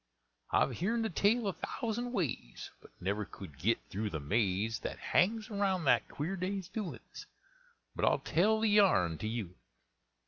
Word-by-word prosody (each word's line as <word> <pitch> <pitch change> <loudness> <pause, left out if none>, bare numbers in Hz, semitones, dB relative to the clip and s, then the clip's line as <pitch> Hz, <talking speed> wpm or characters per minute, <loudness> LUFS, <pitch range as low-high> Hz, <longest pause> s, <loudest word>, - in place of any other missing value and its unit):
I've 125 - +2
heern 225 +6 +1
the 225 - -1
tale 215 +7 +2
a 195 - 0
thousand 240 +5 -3
ways, 150 - -3
But - - -15
never 100 +3 -1
could 90 -8 -11
git 115 +7 +2
through 105 +2 -2
the 80 - -3
maze 105 +6 0
That - - -5
hangs 220 +4 +1
around 195 -3 +1
that - - +4
queer 160 +7 -3
day's 190 0 -3
doin's; 205 -3 -6 0.7
But - - +1
I'll - - +4
tell 215 +7 +2
the 220 - +3
yarn 95 - +4
to 110 - -3
youans. 110 -6 -3
175 Hz, 165 wpm, -33 LUFS, -, 0.7 s, that